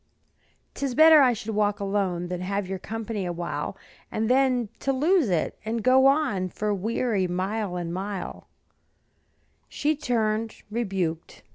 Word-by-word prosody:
"'Tis 275 -3 -3
better 315 0 +8
I 255 -3 +5
should 220 -1 -5
walk 205 -1 +1
alone 195 -3 -1
Than 180 0 -4
have 200 +1 -2
your 190 0 -4
company 220 0 -4
awhile, 175 -1 -4 0.3
And 220 +1 -1
then 255 -4 +2
to 275 - 0
lose 300 - +2
it, 170 -4 -1
and 220 +1 -3
go 260 +1 +6
on 240 -11 +1
For 210 +3 -2
weary 210 0 0
mile 190 +2 -2
on 170 -1 -3
mile," 190 0 -5 1.2
She 305 +1 0
turned, 225 -5 -1
rebuked. 190 -8 -3
215 Hz, 140 wpm, -26 LUFS, 185-245 Hz, 1.2 s, better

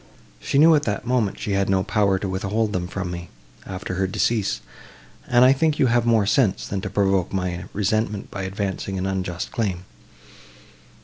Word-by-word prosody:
She - - -1
knew 160 +3 +7
at 150 - +4
that 105 0 -2
moment, 120 -5 0
she 105 - -3
had 100 0 +1
no 95 -1 +2
power 105 -2 +2
to 100 - -3
withhold 105 +3 -1
them 90 -1 -2
from 95 -1 -4
me, 85 -1 -7 0.4
after 95 0 -5
her 95 +1 0
decease; 105 +1 0 0.7
and 120 +1 +5
I 130 - +7
think 155 +2 +1
you - - +3
have 120 -1 +2
more 115 -3 +4
sense, 110 -2 +2
than 100 -1 -3
to 100 - -4
provoke 95 -2 +1
my 90 -2 -2
resentment 105 0 -1
by 100 - -5
advancing 95 0 -3
an 95 - -2
unjust 95 -2 -3
claim. 95 -7 -2
100 Hz, 185 wpm, -23 LUFS, 95-110 Hz, 0.7 s, knew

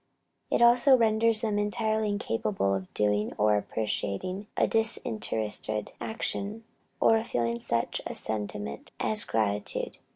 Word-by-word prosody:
It - - +3
also 245 +3 +6
renders 225 -1 +4
them 210 -2 0
entirely 215 +1 0
incapable 105 - -1
of 95 -1 -4
doing 105 0 0
or 105 0 +3
appreciating 110 - -3
a - - +4
disinterested 110 - -1
action, 220 0 -3 0.4
or 225 - +5
of 225 +1 -3
feeling 115 -1 -1
such 115 0 -1
a - - -6
sentiment 105 -8 -4
as 215 -1 +2
gratitude. 105 -2 -1
120 Hz, 125 wpm, -28 LUFS, -, 0.4 s, also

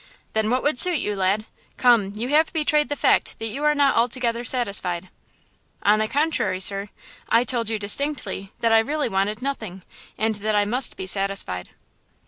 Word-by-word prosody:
"Then 220 0 0
what 255 +2 0
would 290 -4 +1
suit 360 -3 +5
you, 210 -6 -2
lad? 195 +3 0 0.3
Come, 230 -6 +3
you 235 +4 -4
have 310 +2 +3
betrayed 300 -3 +1
the 290 - -2
fact - - +1
that 225 - -4
you 275 +7 -5
are 300 0 +3
not 285 -2 +3
altogether 235 0 0
satisfied." 195 -8 -1 0.7
"On 210 +1 +4
the 215 - +1
contrary, 295 -8 0
sir, 195 +1 +3 0.4
I 230 +1 +4
told 235 -2 -1
you 220 - -1
distinctly 210 -2 -1
that 230 -1 +2
I 225 - +6
really 290 +4 -1
wanted 205 +4 -1
nothing, 220 -10 -5 0.3
and 220 +1 0
that 215 +1 -1
I 205 0 +2
must 250 +6 -1
be 190 - -5
satisfied." 195 - -1
225 Hz, 180 wpm, -23 LUFS, 200-265 Hz, 0.7 s, I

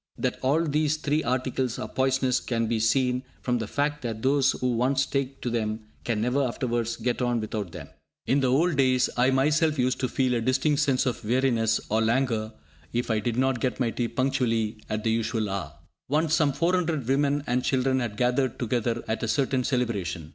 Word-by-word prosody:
That - - -2
all 145 +5 +2
these 155 0 +1
three 155 0 0
articles 130 0 -1
are - - -4
poisonous 130 -1 +1
can 115 -2 -1
be 115 0 0
seen 125 +3 +2 0.2
from 125 -1 0
the 110 - -3
fact 145 +4 -1
that 115 -2 -5
those 135 0 +3
who 125 0 -1
once 130 +3 +1
take 135 -1 -3
to 120 - -2
them 110 -1 -2 0.2
can 115 -3 -1
never 125 +5 +1
afterwards 120 -3 -1
get 120 +2 -2
on 120 -1 +1
without 105 -4 -4
them. - - -8 0.4
In 140 - +2
the 130 - +2
old 155 +4 +2
days, 130 -2 +3
I 125 +1 +3
myself 150 +4 +2
used 125 0 +1
to 130 - 0
feel 130 0 0
a 120 - 0
distinct 130 +4 +1
sense 130 -2 +2
of 125 -2 -2
weariness 115 -1 +2
or 110 +1 +1
langour 115 -1 +1 0.4
if 120 0 -1
I 110 - +2
did 115 +2 -2
not 130 -1 +1
get 125 +2 -1
my 120 -3 +1
tea 120 0 -1
punctually 115 -5 0
at 110 0 -2
the 115 - +1
usual 110 -1 0
hour. 80 -7 -4 0.4
Once 155 +2 +1
some 150 -3 +3
400 165 -2 0
women 140 +2 +1
and 125 -1 0
children 130 0 +1
had 115 -4 -3
gathered 125 +1 +1
together 120 -1 -1
at 110 - -2
a 115 - -1
certain 130 0 +1
celebration. 100 - -2
125 Hz, 200 wpm, -26 LUFS, 115-135 Hz, 0.4 s, those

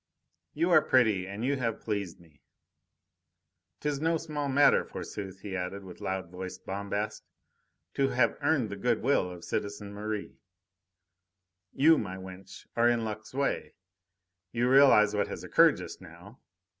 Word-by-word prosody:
"You 170 +4 +1
are 155 - +7
pretty 110 -10 +2
and 100 +4 -4
you 140 +1 +1
have 115 -4 -2
pleased 100 -5 -4
me. 80 -5 -22 1.4
'Tis 145 -1 -2
no 165 +1 +2
small 150 -3 -4
matter, 140 +2 +5
forsooth!" 95 -2 -7
he 100 -2 -5
added, 95 +2 -4
with 90 -2 -12
loud 95 -2 -3
voiced 95 0 -8
bombast, 100 +2 -3 0.7
"to 135 - +2
have 125 -3 +2
earned 140 -6 +1
the 100 - -5
good 120 +2 0
will 125 -8 +2
of 90 -1 -10
citizen 100 0 -4
Merri. 105 0 -5 1.3
You, 160 +2 +5
my 95 -3 -5
wench, 95 0 -11
are 120 0 +4
in 115 -1 +1
luck's 110 +2 -7
way. 140 0 -1 0.8
You 120 +1 +1
realise 135 -6 +6
what 105 - 0
has - - -7
occurred - - +5
just - - -8
now. - - -14
105 Hz, 150 wpm, -29 LUFS, 95-135 Hz, 1.4 s, are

